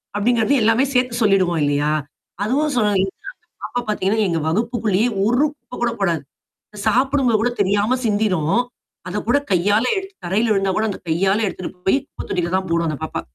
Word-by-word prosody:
அப்படிங்கத 230 +4 +2
எல்லாமே 225 +4 +4
சேர்த்து 250 -1 +1
சொல்லிடுவோம் 185 -5 +3
இல்லையா? 145 +1 +1 0.5
அதுவும் 285 +7 +1
சொல் 210 -3 +3
எங்க 195 - -1 0.6
அப்ப 245 0 -2
பார்த்தீங்கன்னா, 210 +1 0
எங்க 165 -1 0
வகுப்புக்குள்ளேயே 220 +2 +1 0.2
ஒரு 245 +7 +3
குப்ப - - -38
கூட 235 - +2
போடாது. 170 -6 +1 0.6
சாப்படும் 260 +4 +2
பொது 220 - +3
கூட 245 - +2
தெரியாம 205 +6 +2
சிந்திரும். 205 -7 +1 0.6
அத 205 +3 -2
கூட 245 - +4
கையால 205 +5 +3
எடுத்து 385 0 -6
தரையில 210 +6 +1
விழுந்தா 195 -1 +1
கூட 220 - +1
அத 200 - -5
கையால 190 +5 +2
எடுத்துட்டு 185 -1 -5 0.2
போய் 270 - +5
குப்ப - - -9
தொட்டில 175 0 -1
தான் 190 0 -1
போடும் 170 0 +1
அந்த 150 - -3
பாப்பா. 160 - -3
210 Hz, 170 wpm, -20 LUFS, 185-240 Hz, 0.6 s, போய்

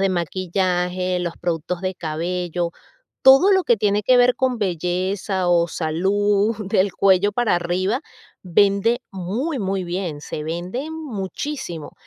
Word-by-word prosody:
de 195 - +3
maquillaje, 180 +1 -1
los 175 -1 -3
productos 170 +1 -2
de 185 0 -2
cabello, 175 +1 -3 0.5
todo 270 +9 +7
lo 380 -2 +3
que 235 - +3
tiene 205 0 +1
que 255 +5 +4
ver 245 0 +4
con 255 -2 0
belleza 185 0 -1
o 170 -1 +3
salud, 200 +7 +1
del 190 -1 +2
cuello 195 +1 +3
para 240 -3 +1
arriba, 185 +7 -1 0.4
vende 200 +6 +2
muy, 220 - -3
muy 190 -1 -2
bien, 175 -4 -4
se 150 - -6
vende 180 - -4
muchísimo. 260 - -5
185 Hz, 135 wpm, -21 LUFS, 175-210 Hz, 0.5 s, todo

